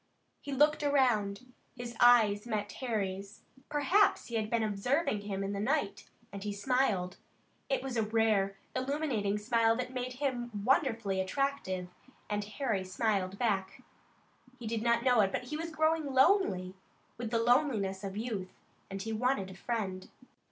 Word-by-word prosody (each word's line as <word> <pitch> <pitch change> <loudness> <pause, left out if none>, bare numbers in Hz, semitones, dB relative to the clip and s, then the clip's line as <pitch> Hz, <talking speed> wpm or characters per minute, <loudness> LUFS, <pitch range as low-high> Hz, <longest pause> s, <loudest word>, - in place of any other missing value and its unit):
He 285 - -7
looked 295 +3 +3
around, 250 -5 +1 0.2
his 240 -1 -7
eyes 225 -3 +5
met 210 -3 -2
Harry's 200 -5 -3 0.3
perhaps 300 +8 +3
he - - -9
had 215 -2 -1
been 230 -1 +1
observing 215 +3 0
him 200 -1 -3
in 195 +1 -3
the 200 - -3
night 235 -2 -1 0.2
and 200 -1 -6
he 210 - -2
smiled. 205 -4 0 0.5
It 270 -1 0
was 265 -2 -4
a 225 - +2
rare, 215 -3 +1 0.2
illuminating 255 -7 -1
smile 225 +1 +2
that 250 +1 -4
made 255 0 -3
him 240 -6 -3
wonderfully 225 -8 +2
attractive, 190 -4 -2 0.4
and 205 0 0
Harry 210 -2 -2
smiled 195 0 -1
back. 200 -5 -1 0.7
He 240 - -9
did 220 0 -2
not 235 0 +2
know 250 -3 +4
it, 195 -1 +2
but - - -2
he 250 +5 -5
was 330 +2 -4
growing 315 -1 +1
lonely, 265 - +3 0.5
with 235 -2 -3
the 230 - +1
loneliness 230 -6 +2
of 195 0 -5
youth, 215 -5 -3 0.4
and 195 0 -5
he 225 0 -3
wanted 220 -4 0
a - - -10
friend. 190 -3 -3
225 Hz, 160 wpm, -31 LUFS, 200-260 Hz, 0.7 s, eyes